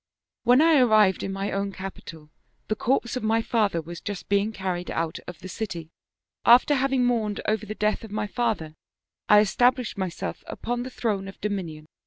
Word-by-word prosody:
" - - -66
When 250 +5 +6
I 320 -3 +5
arrived 215 -6 +4
in 195 - -3
my 195 +1 -3
own 200 0 -2
capital 170 -5 -9 0.4
the 215 - +1
corpse 240 +2 0
of 255 - -2
my 225 +1 +1
father 205 -9 +1
was 170 +1 -8
just 205 -3 -6
being 200 +2 +2
carried 185 -4 -4
out 165 -1 -2
of 180 - -7
the 185 - -7
city. 175 -5 -5 0.5
After 245 +5 +6
having 265 -2 +2
mourned 220 -4 0
over 215 0 0
the 215 - -5
death 215 +1 0
of 225 - -8
my 210 +1 -2
father 215 -9 -2 0.6
I 210 0 +8
established 245 +1 +1
myself 185 -3 -4
upon 240 +1 -3
the 255 - -5
throne 205 -6 -2
of 195 - -10
dominion. 180 -7 -4
210 Hz, 190 wpm, -25 LUFS, 190-235 Hz, 0.6 s, I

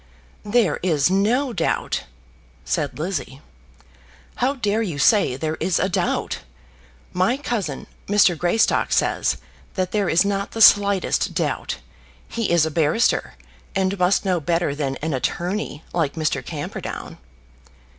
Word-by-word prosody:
"There 205 -6 +2
is 165 -2 +2
no 235 +7 +2
doubt," 165 -6 -1 0.6
said - - -2
Lizzie; 155 -4 -4 1.0
"how 265 +3 +1
dare 220 -3 0
you 180 -10 -3
say 150 - +4
there 155 +3 -3
is 185 - +1
a 185 - +1
doubt? 180 -2 -1 0.7
My 185 +8 +2
cousin, 210 - -3 0.2
Mr. 200 -3 +4
Greystock, 175 +7 +1
says - - +1 0.4
that 185 -1 -1
there 205 -3 0
is 170 +4 +4
not 200 0 -2
the 225 - -5
slightest 200 -2 +4
doubt. - - -2 0.5
He 230 -3 -2
is 170 -2 +4
a 160 - -3
barrister, 160 +9 +1 0.4
and 190 0 0
must 180 +2 +2
know 185 -2 +1
better 165 0 0
than 140 -2 -2
an 160 -1 -1
attorney 175 - -2
like 160 -5 0
that 165 - -7
Mr. 145 -4 0
Camperdown." 150 0 -6
180 Hz, 135 wpm, -22 LUFS, 160-205 Hz, 1.0 s, say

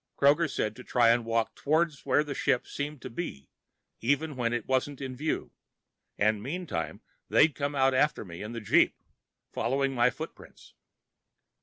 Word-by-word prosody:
Kroger 150 +4 +4
said 105 0 -1
to 125 - -9
try 120 -2 +3
and 120 0 +4
walk 115 0 0
toward 160 +2 +1
where 140 +2 +3
the 145 -2 -5
ship 125 - +1
seemed 145 -1 -5
to - - -5
be, 115 - -6 0.5
even 145 +5 0
when 120 -2 0
it 120 -2 -2
wasn't 130 +1 0
in 130 -2 -5
view, 150 +4 -2 0.7
and 105 0 +2
meantime 125 - -4 0.3
they'd 155 -1 +5
come 145 +1 -2
out 135 -1 +3
after 140 -3 +2
me 85 -2 -9
in 105 - -5
the 115 -1 -5
jeep, 105 - +4 0.6
following 135 +3 0
my 120 -2 +4
footprints. - - -10
130 Hz, 165 wpm, -29 LUFS, 115-145 Hz, 0.7 s, they'd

